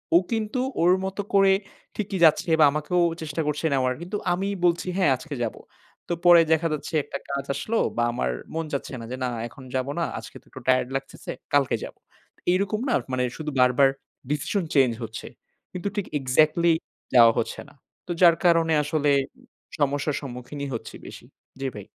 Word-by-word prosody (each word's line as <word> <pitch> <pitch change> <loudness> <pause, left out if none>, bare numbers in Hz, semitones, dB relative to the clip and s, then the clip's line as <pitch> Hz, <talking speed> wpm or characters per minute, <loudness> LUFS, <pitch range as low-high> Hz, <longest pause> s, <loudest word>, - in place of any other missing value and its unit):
ও - - +10
কিন্তু 225 +3 -1 0.2
ওর 175 - +5
মতো 195 +1 -3
করে 195 -1 +6 0.4
ঠিকই 200 -2 -3
যাচ্ছে 160 +2 +3
বা 155 - +8
আমাকেও 155 +4 0 0.2
চেষ্টা 160 0 -3
করছে 150 +2 -1
নেওয়ার। 130 -1 +1
কিন্তু 180 +4 -4 0.2
আমি 190 +3 -2 0.2
বলছি, 175 +1 +1
"হ্যাঁ 170 -8 +3
আজকে 145 +3 -7
যাবো।" 115 - -4 0.5
তো - - +1
পরে 175 -1 +9
দেখা 160 +1 +1
যাচ্ছে 155 - -5
একটা 140 - -6
কাজ 140 0 -2
আসলো 230 +1 -2 0.2
বা 120 - +2
আমার 65 - -1 0.2
মন 165 0 -2
চাচ্ছে 140 - -3
না 115 - -7
যে 130 - -4
না 125 - 0 0.2
এখন 130 - -14
যাব 130 +1 0
না। - - +1 0.2
আজকে - - -12
তো - - -36
একটু - - -10
টায়ারড 130 -1 +3
লাগতেছে। 135 0 -5 0.2
কালকে 140 -3 +3
যাবো। - - -12 0.5
এইরকম 200 +3 0
না - - +2 0.2
মানে 125 0 +1
শুধু 155 -1 -4
বারবার 125 +2 +5 0.4
ডিসিশন 175 +6 -1
চেঞ্জ 135 -3 +5
হচ্ছে। 110 -1 -7 0.5
কিন্তু 180 +2 -4
ঠিক 205 - -1
এক্সাক্টলি 155 +5 +3 0.4
যাওয়া 115 -2 +8
হচ্ছে - - -3
না। - - -20 0.3
তো 175 - -4
যার 170 -2 +7
কারণে 165 -2 +4
আসলে 150 -1 +1 0.7
সমস্যার 145 +1 0
সম্মুখীনই 135 +2 -6
হচ্ছি 115 - -6
বেশি। - - -11 0.4
জি 135 - -1
ভাই। 105 -1 -8
150 Hz, 180 wpm, -25 LUFS, 130-175 Hz, 0.7 s, ও